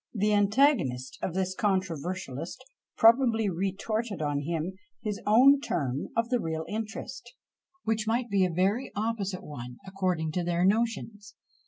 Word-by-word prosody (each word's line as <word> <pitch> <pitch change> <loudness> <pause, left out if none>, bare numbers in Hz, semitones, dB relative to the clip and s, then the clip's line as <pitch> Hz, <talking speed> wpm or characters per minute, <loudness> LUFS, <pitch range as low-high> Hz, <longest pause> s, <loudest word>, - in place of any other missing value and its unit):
_" - - -3
The 210 +1 +3
antagonist 205 - +2
of 180 - -3
this 190 0 0
controversialist 185 - -2 0.3
probably 225 -2 +5
retorted 200 +4 -2
on 145 -2 0
him 165 +4 -2 0.3
his 210 -2 -3
own 260 +6 +7
term 140 - -2
of 230 0 +1
the 250 -1 +2
real 160 -4 -3
interest, 225 +3 -6 0.5
which 220 -1 -1
might 235 +2 +1
be 200 -3 +2
a 185 - +2
very 195 +9 0
opposite 205 -3 -2
one, 125 -4 -8
according 185 -5 -1
to 175 +3 -1
their 175 +1 +1
notions! 210 -1 -1
195 Hz, 145 wpm, -28 LUFS, 170-225 Hz, 0.5 s, own